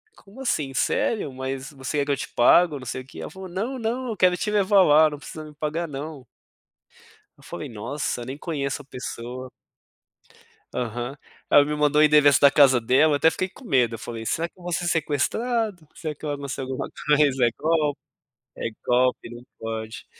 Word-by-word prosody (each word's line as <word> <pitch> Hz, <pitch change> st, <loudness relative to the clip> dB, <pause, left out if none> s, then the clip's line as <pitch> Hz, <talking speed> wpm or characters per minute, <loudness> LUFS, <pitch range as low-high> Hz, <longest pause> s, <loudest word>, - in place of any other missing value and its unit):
como 210 Hz, -, -14 dB
assim? 150 Hz, -, -1 dB
Sério? 150 Hz, -, 0 dB
Mas 130 Hz, +1 st, -5 dB
você 140 Hz, +1 st, -3 dB
quer 140 Hz, -, +1 dB
que 145 Hz, -, -1 dB
eu 140 Hz, -, +1 dB
te -, -, -5 dB
pago?" 155 Hz, +6 st, +4 dB
Não 130 Hz, -, -10 dB
sei 130 Hz, +2 st, -4 dB
o -, -, -14 dB
quê. -, -, -11 dB
Ela -, -, -7 dB
falou: 190 Hz, -1 st, -9 dB
"Não, 225 Hz, +9 st, -3 dB
não. 245 Hz, +3 st, -2 dB
Eu 220 Hz, -, -4 dB
quero 180 Hz, 0 st, +4 dB
te 210 Hz, +2 st, -2 dB
levar 200 Hz, -1 st, +4 dB
lá, 155 Hz, -1 st, +6 dB
não 150 Hz, -, -7 dB
precisa 155 Hz, +2 st, -9 dB
me 150 Hz, -1 st, -13 dB
pagar 155 Hz, +3 st, -2 dB
não." 145 Hz, -1 st, -7 dB, 1.1 s
Eu -, -, -20 dB
falei: -, -, -7 dB
"Nossa, 120 Hz, +2 st, -4 dB
nem 130 Hz, +3 st, -6 dB
conheço 145 Hz, -4 st, -3 dB
a -, -, -22 dB
pessoa." 125 Hz, -1 st, -7 dB, 1.2 s
Aham, 120 Hz, +2 st, -4 dB, 0.3 s
ela 145 Hz, -, +7 dB
me 150 Hz, +1 st, -2 dB
mandou 150 Hz, 0 st, +3 dB
o -, -, +7 dB
endereço 150 Hz, -2 st, +6 dB
da 140 Hz, -, +8 dB
casa 135 Hz, -3 st, +5 dB
dela, 130 Hz, +7 st, +4 dB
eu -, -, +3 dB
até 150 Hz, -, +4 dB
fiquei 185 Hz, +3 st, -1 dB
com 255 Hz, -, -16 dB
medo, 125 Hz, -, +2 dB
eu -, -, -15 dB
falei: 115 Hz, 0 st, -7 dB
"Será 165 Hz, +8 st, -1 dB
que -, -, -42 dB
eu 180 Hz, -, -17 dB
vou 175 Hz, 0 st, -5 dB
ser 175 Hz, -, -1 dB
sequestrado? 180 Hz, -, -1 dB
Será 160 Hz, -3 st, -4 dB
que 150 Hz, -, -14 dB
eu 150 Hz, -, -2 dB
anuncio 140 Hz, -2 st, -4 dB
alguma 130 Hz, 0 st, -4 dB, 0.2 s
coisa? 145 Hz, -4 st, +4 dB
É 120 Hz, -, +4 dB
golpe? 155 Hz, -2 st, +1 dB, 0.6 s
É -, -, -3 dB, 0.2 s
golpe, 125 Hz, -1 st, +2 dB
não 120 Hz, +1 st, -10 dB, 0.2 s
pode." 110 Hz, 0 st, -6 dB
145 Hz, 205 wpm, -24 LUFS, 130-170 Hz, 1.2 s, da